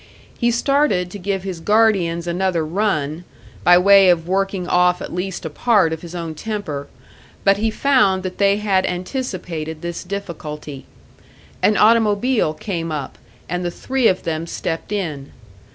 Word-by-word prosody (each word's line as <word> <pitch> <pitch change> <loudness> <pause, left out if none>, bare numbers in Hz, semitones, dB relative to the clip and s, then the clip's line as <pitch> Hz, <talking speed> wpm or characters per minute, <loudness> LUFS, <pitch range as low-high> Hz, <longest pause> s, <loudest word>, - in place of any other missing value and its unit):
He 240 - +2
started 240 -7 +1
to 205 - -7
give 195 0 -2
his 185 -3 -5
guardians 190 -4 +2
another 175 -1 0
run, 160 -3 -1 0.4
by 175 0 +7
way 195 +1 +6
of 170 -2 +2
working 195 -1 -1
off 180 0 +3
at - - -7
least 180 0 -4
a - - -2
part 200 -2 +2
of 160 - -6
his 175 0 -9
own 165 -2 -4
temper; 155 -6 -5 0.6
but 195 0 +4
he 220 +2 0
found 215 -7 +2
that 185 -1 -6
they 200 0 +4
had 200 -3 +1
anticipated 180 - -4
this 170 0 -4
difficulty. 155 -7 -7 0.7
An 215 - +3
automobile 220 -4 +3
came 165 -3 -4
up 145 -4 -5 0.3
and 180 0 -3
the 175 - -1
three 260 +7 0
of 185 - +1
them 165 0 -3
stepped 165 +2 -4
in. 155 -9 -4
180 Hz, 155 wpm, -20 LUFS, 165-205 Hz, 0.7 s, by